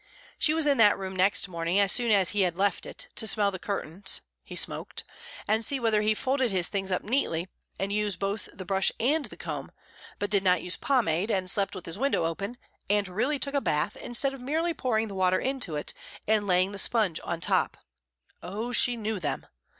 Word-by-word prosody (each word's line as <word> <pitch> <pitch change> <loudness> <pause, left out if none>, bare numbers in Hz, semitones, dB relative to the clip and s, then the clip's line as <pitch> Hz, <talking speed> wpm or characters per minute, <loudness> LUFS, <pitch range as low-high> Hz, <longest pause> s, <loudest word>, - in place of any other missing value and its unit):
She 310 0 +3
was 320 -1 +2
in 280 -3 +3
that 210 -2 +6
room 190 -1 -5
next 190 +2 +2
morning 170 +1 0
as 200 -1 +4
soon 240 -1 +3
as 195 -4 +4
he 205 - +1
had 180 -3 +2
left 200 +2 0
it, - - -5
to 220 - 0
smell 205 -1 +2
the 185 - -6
curtains 190 -1 -2 0.2
(he - - -9
smoked), - - -3 0.4
and 220 +2 +2
see 275 +3 0
whether 220 -3 +2
he 215 0 +2
folded 260 +1 +1
his 185 -4 +1
things 195 -2 -1
up 185 - 0
neatly 200 -8 0 0.3
and 195 +1 -1
used 210 -2 0
both 200 +2 -3
the 185 - -9
brush 190 +1 +2
and 285 +6 +2
the - - -8
comb, - - -5 0.5
but 205 0 -2
did 200 -2 +4
not 180 -3 +3
use 180 - -2
pomade, 210 - +1
and 185 -4 +1
slept 200 -1 0
with 185 - -8
his 165 +5 -6
window 275 -10 +1
open, 200 +8 -3 0.3
and 205 -1 +3
really 245 +11 0
took 280 +1 -3
a 280 - +2
bath 150 - 0
instead 270 +3 -1
of 270 - -9
merely 320 +6 0
pouring 225 -7 0
the 200 - -7
water 185 -1 +2
into 260 - -2
it 150 - -3 0.3
and 210 -1 +2
laying 185 +1 +3
the 200 - -2
sponge 205 -6 +1
on 170 - -3
top - - +1 0.6
(oh, 215 +6 -4
she 245 0 +5
knew 215 -2 -2
them!) 155 -4 -3
205 Hz, 215 wpm, -28 LUFS, 185-240 Hz, 0.6 s, that